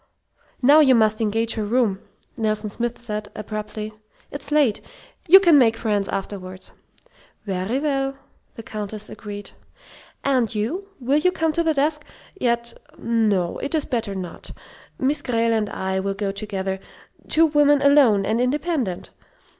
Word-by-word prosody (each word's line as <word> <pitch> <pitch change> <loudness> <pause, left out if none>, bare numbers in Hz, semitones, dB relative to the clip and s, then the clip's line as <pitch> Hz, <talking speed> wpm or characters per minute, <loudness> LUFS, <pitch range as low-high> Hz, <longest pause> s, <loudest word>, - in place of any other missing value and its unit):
"Now 290 +5 +7
you 265 -4 +6
must 215 -1 +2
engage 225 +1 0
her 220 - -2
room," 210 -3 +1 0.4
Nelson 215 -1 -2
Smith 240 +2 -3
said, 210 -3 -5
abruptly. 215 0 -6 0.4
"It's 285 0 -7
late. 290 -8 +3 0.5
You 380 +4 +10
can 340 -6 +6
make 225 -3 +3
friends 205 -4 -1
afterward." 190 -1 -6 0.7
"Very 195 +4 -2
well," 275 -2 -1 0.4
the 225 - -9
Countess 210 -1 -6
agreed. 205 -2 -8 0.7
"And 255 -5 +1
you 315 - -2
will 270 +4 +2
you 365 +4 +3
come 325 -3 0
to 335 - +1
the 320 -2 +1
desk? 300 +2 0 0.3
Yet, 235 -7 -1 0.2
no 215 -6 0
it 280 +3 -3
is 310 - 0
better 230 -7 -2
not. 180 -3 -7 0.5
Miss 285 +3 +1
Grayle 230 -3 +1
and 215 -2 0
I 190 0 -2
will 195 +1 -2
go 200 -1 -2
together 195 -2 -4 0.5
two 325 +1 +5
women 290 -2 +4
alone 270 -9 +5
and 225 +4 0
independent. 260 - -1
230 Hz, 145 wpm, -22 LUFS, 210-280 Hz, 0.7 s, You